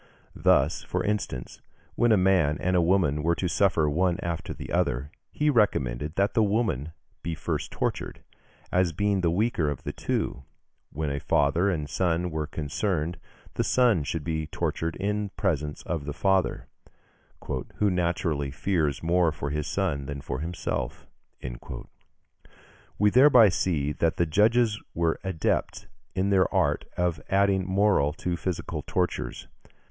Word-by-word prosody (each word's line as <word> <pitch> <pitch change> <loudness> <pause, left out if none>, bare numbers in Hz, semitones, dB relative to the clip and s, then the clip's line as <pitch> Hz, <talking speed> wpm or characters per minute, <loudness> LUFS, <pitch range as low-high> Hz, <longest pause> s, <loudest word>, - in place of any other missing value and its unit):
Thus, 75 +4 +3
for - - -2
instance, 100 -11 -3 0.3
when 120 -1 +3
a 110 - +6
man 90 -6 +3
and 90 +1 0
a 90 - +4
woman 85 -4 +2
were 85 +2 +2
to 90 - -1
suffer 90 -4 +2
one 85 +4 +1
after 85 -1 -3
the - - -7
other, 65 +5 0 0.2
he 150 - -1
recommended 75 - +1
that 100 +1 +1
the 115 - +3
woman 100 - 0 0.3
be 85 -1 -3
first 80 - -3
tortured, - - -3 0.5
as 90 -2 +2
being 100 +2 +1
the 85 - +2
weaker 90 -3 +1
of 70 -4 -5
the - - -4
two; - - -2 0.5
when 75 -1 -2
a 70 - -2
father 80 +9 +2
and 75 -6 -2
son 90 +2 0
were 75 -1 -2
concerned, 80 +2 -2 0.3
the - - 0
son 120 -11 +3
should 75 +3 -3
be 80 0 -2
tortured 80 +1 -2
in 105 +1 -1
presence 75 -6 -1
of 80 -5 -3
the 75 - -4
father, 95 0 +1 1.1
"who 105 -2 +2
naturally 85 -5 0
fears 75 0 -1
more 85 0 +3
for 70 -1 -4
his 75 0 -2
son 80 -9 -1
than 70 -1 -5
for 65 - -4
himself." 80 -6 -4 1.9
We 105 +1 +4
thereby 125 -4 +7
see 80 -5 0
that 80 +2 0
the 85 - +3
judges 110 +6 +3
were 85 -1 +1
adepts 95 -5 -1 0.3
in 95 +1 +1
the 95 -2 +4
art - - +1
of 85 -3 0
adding 95 -1 +2
moral 95 -7 +3
to 90 0 -3
physical 90 0 -3
tortures. 90 -1 -2
85 Hz, 150 wpm, -27 LUFS, 75-95 Hz, 1.9 s, thereby